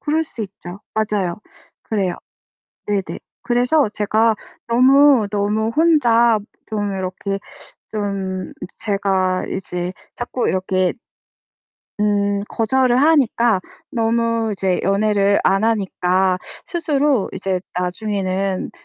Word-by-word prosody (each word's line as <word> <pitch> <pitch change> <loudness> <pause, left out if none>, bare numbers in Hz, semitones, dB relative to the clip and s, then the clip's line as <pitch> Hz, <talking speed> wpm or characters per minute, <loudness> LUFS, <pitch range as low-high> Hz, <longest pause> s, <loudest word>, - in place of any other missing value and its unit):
그럴 315 +2 0
수 240 - -9
있죠. 190 -1 -9
맞아요. 205 -5 0 0.5
그래요. 195 -5 -1 0.7
네네. 200 -2 -2 0.2
그래서 245 +2 +2
제가 220 +2 +2 0.3
너무, 260 -1 +5
너무 210 +2 0
혼자 240 -9 +4 0.3
좀 205 -2 -2
이렇게 190 +1 -3 0.5
좀 195 -3 -3 0.2
제가 190 -3 0
이제 180 -1 -4 0.2
자꾸 245 +1 -2
이렇게 185 -1 +1 1.1
음 205 -1 +1
거절을 250 +2 +2
하니까 240 -9 +3 0.3
너무 230 -1 0
이제 190 -2 0
연애를 200 +1 +2
안 195 +2 +3
하니까 190 -4 +1 0.3
스스로 290 - +1
이제 190 -1 -2 0.2
나중에는 190 0 -2
210 Hz, 205 characters per minute, -20 LUFS, 190-235 Hz, 1.1 s, 너무